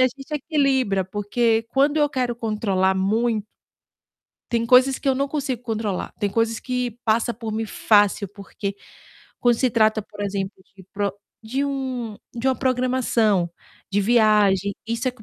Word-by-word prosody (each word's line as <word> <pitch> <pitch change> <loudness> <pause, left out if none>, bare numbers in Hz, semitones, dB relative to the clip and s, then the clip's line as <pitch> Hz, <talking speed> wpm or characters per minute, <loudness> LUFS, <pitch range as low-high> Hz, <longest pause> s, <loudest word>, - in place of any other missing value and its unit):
a 255 - +6
gente 270 +4 -8
equilibra, 270 - +1
porque 220 +3 +1
quando 280 +4 +2
eu 295 - +3
quero 255 -4 -1
controlar 205 -4 0
mui 215 +3 +1 1.1
Tem 230 -1 0
coisas 255 +2 +5
que - - -4
eu 265 - +2
não 275 +2 0
consigo 275 -4 -3
controlar, 220 -5 -3
tem 205 - 0
coisas 225 +2 0
que 250 -1 -2
passa 230 +2 +1
por 225 -1 -6
mim 220 +1 -2
fácil, 205 -1 +3
porque, 200 +1 -6 0.7
quando 240 -1 +4
se 255 +1 +1
trata, 220 -1 +3
por 205 - -13
exemplo, 195 -1 -2 0.2
de 190 - -14
pro 200 -1 -1 0.3
de 250 +5 -2
um 260 -5 -3 0.2
de 240 +2 0
uma 260 - +2
programação, 245 -7 +1 0.4
de 205 - +3
viagem, 205 -3 +3
isso 230 +3 -2
é - - 0
com 245 -3 -18
230 Hz, 160 wpm, -23 LUFS, 205-255 Hz, 1.1 s, a